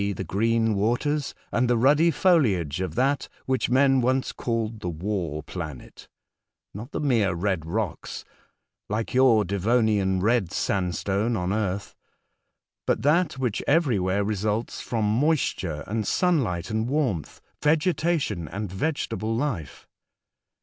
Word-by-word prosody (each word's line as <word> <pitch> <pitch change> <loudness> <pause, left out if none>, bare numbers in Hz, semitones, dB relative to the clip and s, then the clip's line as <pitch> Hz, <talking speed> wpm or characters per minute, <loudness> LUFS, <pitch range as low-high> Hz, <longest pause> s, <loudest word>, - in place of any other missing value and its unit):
the 95 - -4
green 115 +4 +1
waters 120 +8 0 0.2
and 120 +1 +1
the 120 - +3
ruddy 145 +7 +4
foliage 100 - +2
of 90 -4 -3
that 135 +4 +1 0.2
which 130 -2 0
men 135 +1 +4
once 130 +2 +1
called 115 -2 -3
the 90 - -4
w^ar 85 -3 -3
planet; 75 -8 -8 0.7
not 115 +8 -8
the - - -3
mere 115 - +2
red 90 -3 -1
rocks 95 -1 -3 0.6
(like 110 +2 -2
your 125 -5 +5
Devonian 100 -1 +1
red 105 -3 +1
sand 90 -3 -1
stone 105 +4 0
on 90 +1 -1
earth), 100 -2 -2 0.9
but - - +1
that 160 +4 +3
which 130 -5 -2
everywhere 105 - +2
results 105 +2 -2
from 115 -3 -1
moisture 105 - 0
and 110 +1 -2
sunlight 120 - +1
and 110 +2 -1
warmth 130 - -1
— - - -46
vegetation 155 - +1
and 100 +4 -5
vege 145 +11 -1
table 110 0 -2
life. 115 - -3
110 Hz, 135 wpm, -25 LUFS, 95-130 Hz, 0.9 s, your